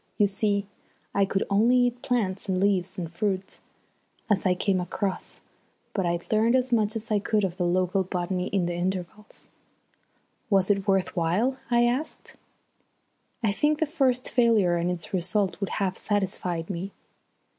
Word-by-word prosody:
You 205 - +5
see, 200 0 0 0.5
I 200 - +3
could 195 0 -1
only 225 +5 +4
eat 245 0 +1
plants 205 -7 -1
and 185 -1 +1
leaves 190 -2 +1
and 175 -3 -3
such 170 +1 -20
fruit 195 -2 -2 0.7
as 195 -1 +2
I 180 - +3
came 185 0 +1
across; 190 +2 -4 0.5
but 190 -4 0
I'd 170 0 -3
learnt 225 +3 +3
as 255 0 +1
much 215 -2 +2
as 225 +1 -6
I 210 - +3
could 210 +1 0
of 185 -2 -2
the 180 -2 0
local 185 +2 +1
botany 180 0 -2
in 195 -3 0
the 175 - -2
intervals." 185 +4 -5 1.0
"Was 195 -1 +3
it 195 0 -1
worth 195 -2 +1
while?" 190 +10 +1
I 240 0 +4
asked. 255 +6 -3 1.1
"I 215 - +3
think 295 +8 +1
the 315 - +1
first 270 -5 +1
failure 225 -8 +3
and 170 +1 0
its 180 0 -4
result 190 +2 0
would 195 - -2
have 190 -2 -2
satisfied 185 -4 -2
me." 190 +2 -5
195 Hz, 165 wpm, -26 LUFS, 185-220 Hz, 1.1 s, You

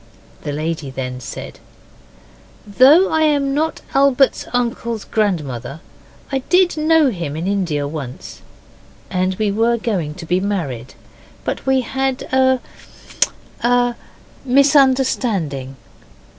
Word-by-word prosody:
The 145 - -4
lady 155 0 -3
then 125 -1 -5
said, 120 - -8 1.1
'Though 270 - +5
I 315 - +2
am 285 -3 +2
not 315 +3 -1
Albert's 275 -1 +3
uncle's 235 -2 -2
grandmother 150 - -2 0.5
I 270 - +1
did 360 0 +4
know 310 -2 +3
him 170 -7 -4
in 160 +3 -4
India 175 -8 -1
once, 140 -4 -7 0.7
and 185 +1 0
we 210 0 0
were 230 +3 +2
going 185 -10 -2
to 170 - -8
be 180 +2 +1
married, 160 - -3 0.5
but - - -4
we 265 -1 +3
had 265 +2 -2
a 260 0 +4 1.0
a 245 0 +2 0.5
misunderstanding. 255 - +2
220 Hz, 115 wpm, -19 LUFS, -, 1.1 s, Though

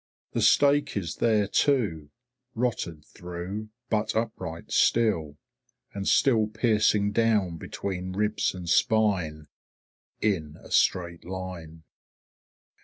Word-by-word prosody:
The - - -1
stake 145 -4 +4
is 85 -5 -4
there 110 -3 +2
too, 100 - +1 0.5
rotted 100 -10 -2
through, 90 +5 -7 0.2
but 110 0 0
upright 110 -7 -4
still, 85 -11 +2 0.6
and 100 -1 -4
still 115 -6 +4
piercing 105 -2 +2
down 105 -6 +1
between 95 +2 -5
ribs 105 0 0
and 90 -1 -7
spine 90 -7 +1 0.7
in 80 -8 -1
a - - -15
straight 85 -2 +1
line. 90 -3 -7
100 Hz, 105 wpm, -27 LUFS, 85-110 Hz, 0.7 s, stake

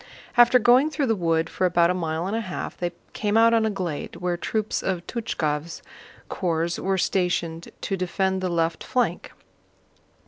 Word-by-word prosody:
After 240 +1 +7
going 250 +5 +5
through 300 -2 -1
the 225 -3 +1
wood 165 -3 +1
for 185 - -1
about 170 0 +3
a - - +1
mile 165 -2 -2
and 200 +3 -2
a 230 - 0
half 185 -5 -5
they 175 -1 -3 0.2
came 210 0 0
out 230 +1 +6
on 225 -1 +3
a - - +1
glade 180 -7 -4
where 180 -1 -2
troops 215 +4 -2
of 180 -2 -2
Túchkov's 165 -9 -3 0.4
corps 170 -1 -1
were 195 0 0
stationed 175 -3 -1
to 195 - -1
defend 190 +1 -1
the 185 - -1
left 165 -1 0
flank. 250 -1 -1
185 Hz, 175 wpm, -24 LUFS, 170-220 Hz, 0.4 s, After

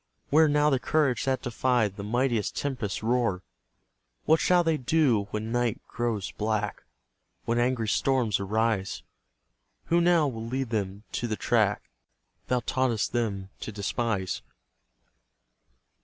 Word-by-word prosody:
Where 155 +2 +6
now 150 0 +3
the 135 - +2
courage 140 -3 +1
that 130 -1 0
defied 120 -4 +1
The 100 - -7
mightiest 120 0 0
tempest's 125 -9 -3
roar? 115 -5 +1 0.8
What 160 +1 +4
shall 180 -1 +4
they 165 -1 +2
do 130 -7 +2
when 110 +1 -4
night 120 -2 0
grows 115 -5 -2
black, 105 -1 -2 0.6
When 115 +1 +1
angry 120 -2 +1
storms 120 -3 +1
arise? 105 0 -1 0.9
Who 170 - +5
now 170 -3 +4
will 115 -3 -5
lead 130 0 -3
them 100 -2 -2
to 120 - -2
the 110 - -1
track - - +1 0.6
Thou 125 -1 +1
taught'st 125 -5 0
them 100 -5 -2
to - - -6
despise? 100 -1 -2
120 Hz, 130 wpm, -27 LUFS, 105-130 Hz, 0.9 s, Where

